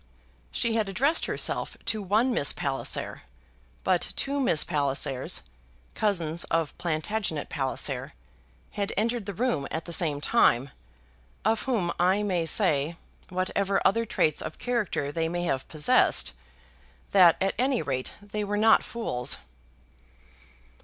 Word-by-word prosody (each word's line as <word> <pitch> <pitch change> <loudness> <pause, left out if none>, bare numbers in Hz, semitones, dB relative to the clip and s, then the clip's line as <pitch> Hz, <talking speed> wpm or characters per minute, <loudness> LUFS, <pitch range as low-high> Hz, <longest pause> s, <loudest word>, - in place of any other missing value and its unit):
She 235 -2 0
had 220 -3 0
addressed 275 - +2
herself - - -1
to 215 - 0
one 215 +6 +2
Miss 140 - +2
Palliser; 135 -1 -2 0.6
but - - +1
two 280 +1 -1
Miss 210 - +3
Pallisers, 140 -3 +1 0.5
cousins 170 -6 +1
of 165 -3 -1
Plantagenet 170 0 -2
Palliser, 135 -3 -2 0.6
had 205 0 -3
entered 230 0 -1
the 200 - -3
room 235 - 0
at 160 - -4
the 170 - -4
same 155 -4 +2
time, 135 - +3 0.7
of 220 0 +2
whom 215 -10 0
I 185 +4 +3
may 180 -5 0
say, 160 -4 +2 0.3
whatever 190 +2 0
other 230 +4 +2
traits 155 -5 +1
of - - -6
character 215 - -1
they 165 +1 -1
may 175 +1 -2
have 135 -6 -2
possessed, 150 -2 +3 0.8
that 180 -4 +6
at 195 0 +1
any 260 -1 +1
rate 130 -2 -3
they 210 +1 -4
were 205 0 -2
not 220 +1 +5
fools. 175 - -2
185 Hz, 130 wpm, -27 LUFS, 155-220 Hz, 0.8 s, that